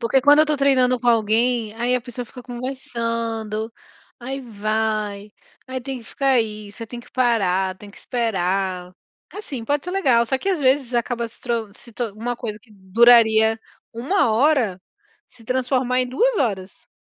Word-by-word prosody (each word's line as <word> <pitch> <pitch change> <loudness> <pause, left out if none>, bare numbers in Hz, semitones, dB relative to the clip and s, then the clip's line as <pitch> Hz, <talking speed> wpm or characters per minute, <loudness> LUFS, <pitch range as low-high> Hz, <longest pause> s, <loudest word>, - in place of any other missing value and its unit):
Porque 250 +3 +2
quando 290 +2 +6
eu 310 - +4
tô 300 -1 +1
treinando 255 -2 +3
com 245 - 0
alguém, 230 0 +2
aí 240 +2 0
a 250 - +1
pessoa 245 0 -6
fica 250 +2 -12
conversando, 230 -3 -4 0.5
aí 265 +3 -5
vai, 215 -2 -2 0.3
aí 260 0 -4
tem 265 +1 -5
que 235 - -14
ficar 275 +4 -2
aí, 215 -3 -1
você 230 +2 -8
tem 240 +2 -8
que 240 - -19
parar, 195 -7 +1
tem 205 +2 -12
que - - -18
esperar. 190 -5 -2 0.4
Assim, 285 - -6
pode 285 +4 -1
ser 360 - -4
legal, 260 -12 +3
só 265 - +1
que 390 - -3
às 370 -5 0
vezes 260 -2 +2
acaba 235 0 -1
se - - -21
tro 230 -3 -2
se 235 - -12
to 230 -2 -3
uma 240 +3 -4
coisa 215 -3 -5
que 225 - -25
duraria 220 +2 +5 0.3
1 255 - +1
hora 235 -6 +2 0.5
se 230 - -18
transformar 255 +1 0
em 250 - -1
2 455 - +1
horas. 195 -7 -3
235 Hz, 175 wpm, -22 LUFS, 215-255 Hz, 0.5 s, quando